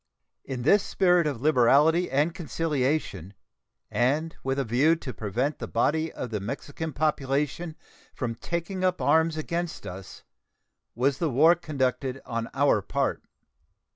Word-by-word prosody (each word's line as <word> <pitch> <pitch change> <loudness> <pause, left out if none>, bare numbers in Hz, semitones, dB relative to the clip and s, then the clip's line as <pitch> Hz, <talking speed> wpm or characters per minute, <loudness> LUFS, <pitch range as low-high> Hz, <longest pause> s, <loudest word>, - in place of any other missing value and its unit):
In 130 -2 -5
this 200 +9 +5
spirit 180 -4 +2
of 140 -6 -3
liberality 150 +5 +4
and 145 +5 +1
conciliation, 145 - -2 0.6
and 150 +7 0
with 135 0 -1
a 140 - +1
view 130 +8 +3
to 135 -6 -7
prevent 120 +8 -2
the - - -5
body 160 +2 0
of 125 - -6
the 105 - -2
Mexican 145 +9 -5
population 150 +2 -1 0.4
from 120 -3 -2
taking 170 - -4
up 185 -1 +1
arms 160 0 +2
against 170 +2 -3
us, 95 +1 -9 0.7
was 135 +3 +1
the 165 - +1
war 150 +6 +6
conducted 135 -5 -2
on 115 -2 -3
our 135 -6 +3
part. - - -1
145 Hz, 140 wpm, -26 LUFS, 125-160 Hz, 0.7 s, war